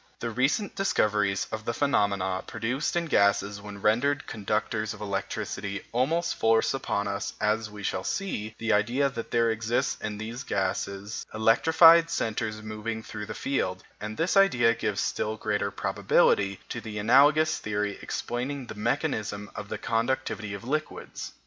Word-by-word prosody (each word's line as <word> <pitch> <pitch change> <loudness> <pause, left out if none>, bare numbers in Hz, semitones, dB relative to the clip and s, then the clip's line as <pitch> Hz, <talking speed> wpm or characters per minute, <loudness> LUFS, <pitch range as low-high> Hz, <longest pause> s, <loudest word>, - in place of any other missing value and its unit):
The 115 - -3
recent 135 - 0
discoveries 105 - +1
on 110 0 -4
the 115 +1 -2
phenomena 100 -9 +1
produced 120 +8 -2
in 170 -1 +1
gases 100 -6 +2
when 100 -1 -9
rendered 140 +7 +2
conductors 110 +1 -2
of 105 - -13
electricity 100 0 -3
almost 150 +8 +1
force 115 0 +2
upon 100 -6 -1
us, 100 0 -3
as 105 +1 0
we 105 -1 -10
shall 95 -1 -1
see, 110 - -3
the 115 -1 0
idea 120 +7 +2
that 115 -2 -6
there 115 -1 +2
exist 115 +1 -1
in 105 -1 -4
these 115 +4 -5
gases 100 0 -3
electrified 160 +9 +6
centres 110 -6 -2
moving 110 +1 -4
through 105 -2 -7
the - - -6
field, 95 -9 -2 0.2
and 105 +1 -6
this 165 +5 +1
idea 125 -13 +5
gives 105 -4 -2
still 110 +1 -1
greater 105 -1 -1
probability 100 -1 +2
to 120 - -4
the 110 -1 -7
analogous 145 +8 +4
theory 105 -1 -2
explaining 130 +3 -3
the 120 - -7
mechanism 110 -3 -2
of 105 - -7
the - - -3
conductivity 115 -3 -1
of 100 - -9
liquids. 155 +5 -4
110 Hz, 155 wpm, -27 LUFS, 105-130 Hz, 0.2 s, electrified